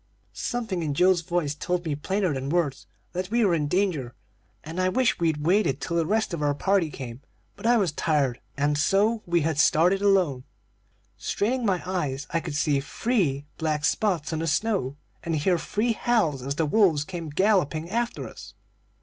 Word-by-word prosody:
"Something 225 -7 -3
in 150 -3 -2
Joe's 180 +1 +4
voice 170 -3 -1
told 175 +3 -2
me 155 - -1
plainer 185 +4 -1
than 135 0 -3
words 160 -5 -1 0.3
that 185 +1 -3
we 235 +1 +2
were 185 - +3
in 150 -3 0
danger, 165 -9 -1 0.5
and 160 +4 -6
I 185 - +2
wished 250 +4 +1
we'd 160 -3 0
waited 175 -7 +2
till 170 - -3
the 165 -2 +1
rest 215 -2 0
of 165 - -3
our 145 -1 +1
party 190 +1 +1
came; 125 -3 -8 0.3
but - - -4
I 240 0 +5
was 190 -7 +1
tired, 145 -5 0 0.2
and 145 +1 +1
so 210 +7 +2
we 170 0 +2
had 155 -1 -1
started 180 +6 +4
alone. 185 -11 +2 0.7
"Straining 240 +3 -1
my 185 -3 0
eyes, 150 -7 -2
I 165 - +1
could 160 -3 -6
see 145 -1 +2
three 150 - -1
black 155 -2 0
spots 170 -7 0
on 160 - -1
the 165 - -2
snow, 160 - 0 0.2
and 165 -1 -2
hear 170 +4 +1
three 225 +7 0
howls 215 - +1
as 140 +2 -3
the 160 - +1
wolves 160 -3 +3
came 170 -1 -6
galloping 165 -2 +1
after 235 +2 -2
us. - - -12
170 Hz, 185 wpm, -26 LUFS, 150-195 Hz, 0.7 s, I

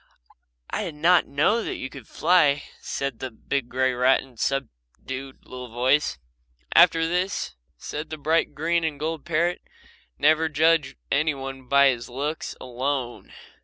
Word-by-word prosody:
"I - - -1
did 165 -4 -6
not 170 +4 +4
know 165 +12 +2
that - - -4
you - - -5
could 130 -3 -12
fly," 150 -5 +3 0.2
said 140 -4 -4
the 130 - -4
big 125 +2 -3
grey 130 +1 +1
rat 125 +2 +3
in 135 - -16
a 125 - -22
subdued 130 - -5
little 125 0 -8
voice. 130 - +1 0.6
"After 165 -1 +6
this," 180 +3 -1 0.2
said 150 +1 -6
the 155 - -5
bright 155 0 +1
green 165 +3 +1
and 155 -3 -2
gold 160 0 -3
parrot, 170 +2 0 0.6
"never 155 +1 +3
judge 155 -2 +2 0.2
any 155 +1 +2
one 135 -1 -7
by 140 +1 +6
his 120 -2 -3
looks 145 +6 -4
alone. 130 0 -3
140 Hz, 155 wpm, -25 LUFS, 130-160 Hz, 0.6 s, After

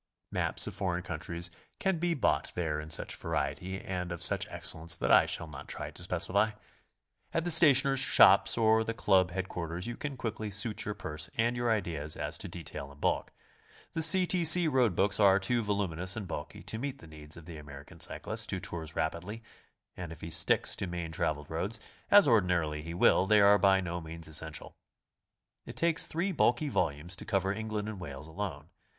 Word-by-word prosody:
Maps - - +2
of - - -5
foreign 90 -1 -2
countries 85 0 -4 0.3
can 190 -4 0
be 170 0 0
bought 140 - 0
there 80 -4 -2
in 75 +1 -8
such 80 - +1
variety 75 +8 -3
and 90 -2 -5
of 85 - -4
such - - +3
excellence 80 +1 +2
that - - -1
I - - +6
shall - - -2
not 70 -4 -10
try - - -6
to - - -6
specify. 90 +5 +1 0.8
At 165 - +1
the 175 - +1
stationers' 140 -4 +6
shops - - +6
or 110 -1 +3
the 115 0 -4
Club 95 -4 +3
head 95 +1 -4
quarters 85 +1 -5
you 120 0 -4
can 140 0 -6
quickly 110 -3 -4
suit 105 +2 -2
your 105 - -3
purse 80 -6 -5
and 120 +1 +1
your 120 0 -1
ideas 85 -9 -2
as - - -4
to - - -5
detail 70 0 -8
and 70 - -17
bulk. - - -1 0.6
The 165 - -2
C. 180 +4 +5
T. 180 -1 +1
C. 165 +1 +6
road 125 - +2
books 100 +3 +2
are 100 -2 +6
too 115 +5 0
vol 105 -2 -1
uminous 90 +3 -4
and 105 -4 -5
bulky 75 0 -7
to 110 +3 -6
meet 135 +1 -4
the - - -14
needs 75 0 -9
of 85 - -12
the 85 -2 -9
American 70 -1 -12
cy - - +1
clist - - -3
who - - -2
tours 80 -2 -6
rapidly, 90 +8 -3 0.5
and 90 -3 -7
if 80 - -11
he 80 - -7
sticks 80 - +2
to 95 - -3
main 85 -2 -5
traveled 80 -4 -2
roads, 95 +8 -2 0.3
as 205 -4 +7
ordinarily 90 - +1
he 85 +2 -7
will, 90 +1 +4
they 105 +1 +5
are 100 0 +6
by 95 -1 +4
no 85 -1 -4
means 80 0 -7
essential. 80 0 -4 0.9
It - - -8
takes 165 -1 +1
three 175 +5 -2
bulky 145 -3 +1
volumes 85 - -2
to - - -8
cover 95 -2 0
England 110 -1 -4
and 110 -3 -6
Wales 70 -4 -8
alone. 80 -3 -6
95 Hz, 205 wpm, -30 LUFS, 80-110 Hz, 0.9 s, as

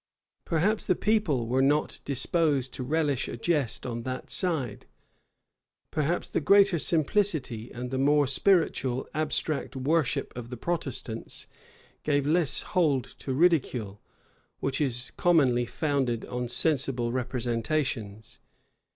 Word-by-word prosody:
Perhaps 185 +7 +1
the 185 - +2
people 195 - +1
were 125 +3 +1
not 145 +3 +1
disposed 140 -2 +1
to - - -5
relish 145 0 0
a - - -5
jest 140 -3 0
on 120 -2 -3
that 130 +1 -5
side: 145 - 0 1.0
perhaps 155 +3 0
the - - -1
greater 195 +2 +5
simplicity 155 - 0
and 125 +1 -6
the 130 - -1
more 145 +1 +4
spiritual 135 -4 +1
abstract 150 -3 -1
worship 145 +2 0
of 120 -1 -7
the 125 - -6
Protestants 135 -7 -4 0.6
gave 145 -2 +1
less 155 -2 +2
hold 150 -8 +3 0.2
to 135 - -5
ridicule, 130 - +1 0.6
which 135 +2 -1
is 125 -3 -2
commonly 135 -9 +3
founded 135 -7 -1
on 125 0 -3
sensible 130 -3 0
representations. 120 -3 -2
135 Hz, 120 wpm, -28 LUFS, 125-160 Hz, 1.0 s, greater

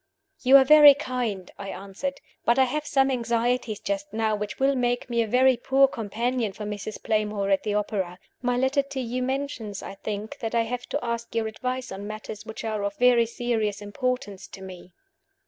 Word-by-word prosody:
"You 265 +2 +8
are 270 - +7
very 295 0 +9
kind," 245 -9 -3
I 200 -1 -6
answered. 200 +10 -5 0.2
"But 235 - +3
I 265 - +6
have 295 +4 -2
some 270 -1 +3
anxieties 235 -2 0
just 200 0 -3
now 220 0 0
which 210 0 -5
will 270 +1 +3
make 245 -1 -1
me 235 0 +2
a 225 - 0
very 255 +3 +4
poor 270 +3 +4
companion 230 -1 -2
for 210 - -7
Mrs. 210 0 -6
Playmore 210 -2 0
at 195 -1 +3
the 210 -1 -2
opera. 200 -4 -2 0.2
My 245 0 0
letter 265 +3 +2
to 275 -1 -6
you 250 0 -2
mentions, 255 -6 -3
I - - -7
think, 210 +1 -6
that 225 +1 -3
I 230 - +3
have 245 +2 -5
to 285 -3 -2
ask 235 0 -4
your 225 -1 +1
advice 255 +3 -4
on 195 +1 -6
matters 215 0 -7
which 220 - -7
are 215 -2 -2
of 200 0 -3
very 245 -2 +5
serious 225 -3 -1
importance 210 -2 -3
to 190 - -11
me." 185 -1 -10
230 Hz, 200 wpm, -26 LUFS, 205-255 Hz, 0.2 s, very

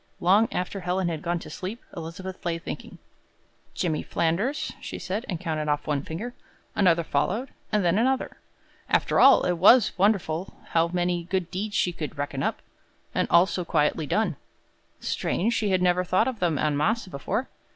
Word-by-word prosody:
Long 200 +6 +4
after 185 +2 -3
Helen 180 0 -1
had 160 -2 -4
gone 175 +1 -1
to 165 - -9
sleep, 190 +8 -5 0.2
Elizabeth 180 +3 -7
lay 170 -1 -1
thinking. 165 - -8 0.8
"Jimmy 160 -4 0
Flanders," 195 - -1
she - - -6
said, 190 +7 -4
and 175 -5 -2
counted 155 -4 -2
off 145 0 0
one 145 -2 0
finger; 190 - -6 0.4
another 170 -4 +4
followed, 190 - -1 0.2
and 210 -3 +2
then 175 +4 +3
another. 260 +2 0 0.5
After - - +2
all, 275 - +7
it 175 -2 0
was 210 +3 +6
wonderful 190 -4 +1
how 165 0 +3
many 175 0 -1
good 185 -1 -2
deeds 205 +3 -3
she 180 - +2
could 155 -4 -6
reckon 140 -1 -3
up, - - -2 0.5
and - - +1
all 170 +1 +6
so 185 -2 -3
quietly 155 -1 +1
done. 185 -3 0 0.6
Strange 225 +6 -1
she 215 -2 0
had 185 -1 +2
never 180 0 +3
thought 185 +6 +2
of 255 -5 -3
them 170 -4 +1
en 150 0 +1
masse 220 +11 +1
before. 140 -7 -3
180 Hz, 175 wpm, -26 LUFS, 165-200 Hz, 0.8 s, all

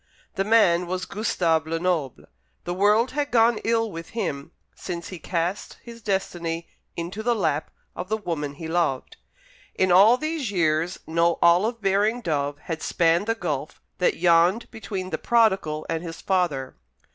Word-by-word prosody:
The 195 - 0
man 185 -5 +4
was 185 +1 -3
Gustave 165 -7 0
Lenoble. 165 -5 -1 0.4
The 175 - -3
world 210 +6 +3
had 290 +1 -2
gone 230 -1 +3
ill 225 -1 +1
with 165 -1 -8
him 150 -9 -3 0.2
since 170 -2 -6
he 185 - -8
cast 175 +4 -3
his 235 -1 -11
destiny 175 -5 -2 0.3
into 175 +5 -4
the 240 +1 +1
lap 155 -8 -1 0.3
of 180 +1 -6
the 220 - 0
woman 155 -8 -4
he 160 +2 -7
loved. 160 -6 -1 0.6
In 185 -1 +2
all 205 +7 +7
these 310 -4 -3
years 165 -2 0
no 170 +1 +1
olive 200 +7 +3
bearing 205 +5 +2
dove 145 -6 -1
had 165 -2 -4
spanned 170 +4 +2
the 225 - +1
gulf 150 -8 -4 0.2
that 180 - +2
yawned 175 +5 +3
between 195 -4 -6
the - - -2
prodigal 190 -10 +2
and 165 -1 -2
his 165 -1 -7
father. 170 -9 -1
180 Hz, 160 wpm, -24 LUFS, 165-215 Hz, 0.6 s, all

